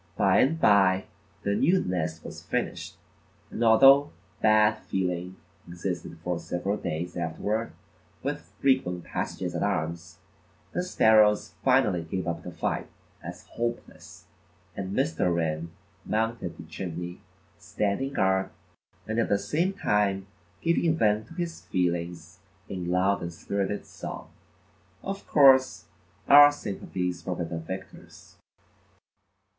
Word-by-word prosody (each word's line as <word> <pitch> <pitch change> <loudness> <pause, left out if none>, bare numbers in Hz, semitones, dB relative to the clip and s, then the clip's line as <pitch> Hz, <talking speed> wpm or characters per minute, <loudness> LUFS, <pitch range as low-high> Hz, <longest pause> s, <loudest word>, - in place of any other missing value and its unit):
By 100 -3 +4
and 160 +5 +2
by 95 -5 +4 0.4
the 100 - 0
new 170 - +3
nest 80 -3 -2
was - - -8
finished, - - -4 0.5
and 120 - -2
although 135 +6 +7 0.3
bad 110 0 +4
feeling 90 -1 -3 0.3
existed 85 -1 -5
for 90 0 -2
several 95 +5 -2
days 85 0 -4
afterward, 100 +7 -2 0.5
with - - -4
frequent 110 -11 +1
passages 90 -2 -4
at 85 - -3
arms, 85 -3 -2 0.5
the 180 - -1
sparrows 110 - +4
finally 125 -9 +3
gave 90 +3 -4
up 85 -1 -2
the 90 - -8
fight - - -2 0.4
as - - -9
hopeless, 120 0 -6 0.5
and 95 0 -4
Mr. 135 - +1
Wren 80 -1 -1 0.3
mounted 110 -6 -2
the - - -9
chimney, 85 +2 -6 0.4
standing 105 +7 -2
guard, 95 -5 +1 0.6
and 110 +2 -2
at 115 - +1
the 100 - +3
same 170 - 0
time 105 - 0 0.4
giving 165 -1 +2
vent 105 -2 +2
to 165 - -13
his 170 -2 -4
feelings 85 -1 -2 0.3
in 90 -2 -5
loud 95 +2 +2
and 85 - -4
spirited 100 +4 -3
song. - - -8 0.7
Of 195 0 -5
course, 135 -2 +5 0.4
our 145 +1 +9
sympathies 90 - -4
were 90 - -2
with 85 -1 -5
the 85 - -3
victors. 95 +4 -10
95 Hz, 125 wpm, -27 LUFS, 85-115 Hz, 0.7 s, our